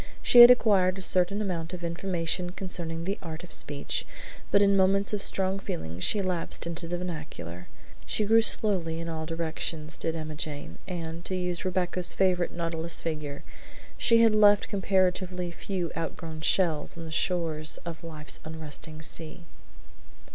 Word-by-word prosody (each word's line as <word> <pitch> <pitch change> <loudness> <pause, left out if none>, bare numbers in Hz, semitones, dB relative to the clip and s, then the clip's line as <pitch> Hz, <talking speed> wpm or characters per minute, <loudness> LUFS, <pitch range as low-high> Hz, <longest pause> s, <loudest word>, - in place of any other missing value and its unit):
She 240 - +8
had 240 - +12
acquired 195 -6 +4
a - - -6
certain 185 +3 +4
amount 170 -3 -4
of 175 - -10
information 175 0 -2
concerning 170 -3 -4
the 195 +2 -2
art 160 0 -7
of 175 - -11
speech, 145 -1 -2 0.5
but 200 - +4
in 200 0 +4
moments 195 +2 +3
of 205 - -1
strong 190 0 +1
feeling 80 - -5
she 200 - +1
lapsed 180 -3 -1
into 170 0 -4
the 175 +1 -2
vernacular. 150 - -7 0.4
She 215 - +1
grew 225 +2 +5
slowly 185 -7 +1
in 165 - -5
all 160 -1 -4
directions, 160 -1 -3
did 165 0 -1
Emma 155 -1 -5
Jane, 145 - -5
and, 170 -2 -5
to 190 - -1
use 180 -1 -2
Rebecca's 180 -1 -1
favorite 180 -2 +2
nautilus 165 -1 -2
figure, 150 -3 -4 0.5
she 230 -1 +4
had 225 -1 +5
left 205 -1 +5
comparatively 185 -2 0
few 175 -1 -4
outgrown 165 -1 -5
shells 160 -2 +1
on 165 - -7
the 160 - -8
shores 160 -2 +1
of 170 -1 -7
"life's 155 -2 -6
unresting 155 0 -7
sea." 165 +2 -5
170 Hz, 160 wpm, -28 LUFS, 160-190 Hz, 0.5 s, had